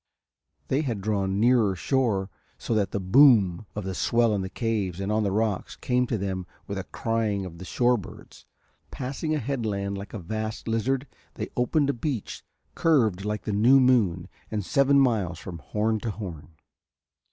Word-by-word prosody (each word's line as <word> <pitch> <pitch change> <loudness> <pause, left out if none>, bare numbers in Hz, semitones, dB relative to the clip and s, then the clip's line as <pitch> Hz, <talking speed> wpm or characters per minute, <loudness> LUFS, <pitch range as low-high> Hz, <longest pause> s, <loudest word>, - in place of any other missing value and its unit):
They 135 +3 +2
had 120 -9 -2
drawn 100 -1 -1
nearer 115 -4 +4
shore 100 -1 0 0.3
so - - -3
that 100 -4 +1
the 100 - -2
boom 100 -3 +5
of 105 - -3
the 95 0 -4
swell 115 +3 +2
in 100 - 0
the 95 - -4
caves 100 -5 -2
and 100 +1 -2
on 110 +1 +2
the 100 -2 0
rocks 105 -1 -1
came 125 0 0
to 115 - -1
them 95 -2 -3 0.2
with - - -4
the - - -6
crying 110 -4 -1
of 85 -2 -9
the 90 - -8
shore 120 +6 +2
birds; 105 +1 -12 0.4
passing 140 +5 -3
a - - +1
headland 110 -7 -2
like 100 +3 -8
a - - -2
vast 110 +5 -5
lizard 125 +4 0 0.3
they - - -4
opened 140 +4 +2
a - - -7
beach 120 -3 -4 0.3
curved 115 - +2
like 105 0 -2
the 105 - -2
new 120 +7 +6
moon 105 -10 +3 0.2
and 105 -3 -3
seven 140 +8 +4
miles 105 -10 +1
from 85 -1 -8
horn 110 +9 -1
to 115 - -3
horn. 90 -7 -7
110 Hz, 180 wpm, -26 LUFS, 95-125 Hz, 0.4 s, new